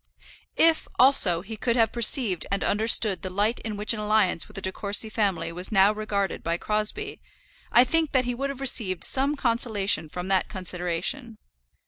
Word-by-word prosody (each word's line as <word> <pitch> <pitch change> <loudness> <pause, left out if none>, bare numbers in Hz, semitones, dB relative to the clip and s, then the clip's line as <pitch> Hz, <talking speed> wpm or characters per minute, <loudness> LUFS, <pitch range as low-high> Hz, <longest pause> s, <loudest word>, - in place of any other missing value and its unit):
If, 325 -1 +2
also, 225 -10 +5
he 220 +4 -9
could 235 +2 -2
have 225 -3 +1
perceived 230 - +3
and 195 - -2
understood 215 -1 +3
the 190 - -6
light 205 +5 -2
in 215 -2 -7
which 210 +2 +1
an 220 - -6
alliance 210 -5 0
with - - -19
the 195 - -7
De 190 - -3
Courcy 210 +2 -1
family 205 -6 -2
was 180 +4 -4
now 195 0 +4
regarded 210 -3 -4
by 170 +1 -3
Crosbie, 215 - -4 0.5
I 245 - +6
think 320 +4 -1
that 260 -2 0
he 245 - -3
would 275 +3 -4
have 275 -1 -8
received 205 -10 +2
some 275 +3 +2
consolation 220 - -1
from 180 +3 -7
that 190 -1 0
consideration. 185 +6 -4
215 Hz, 180 wpm, -24 LUFS, 190-240 Hz, 0.5 s, I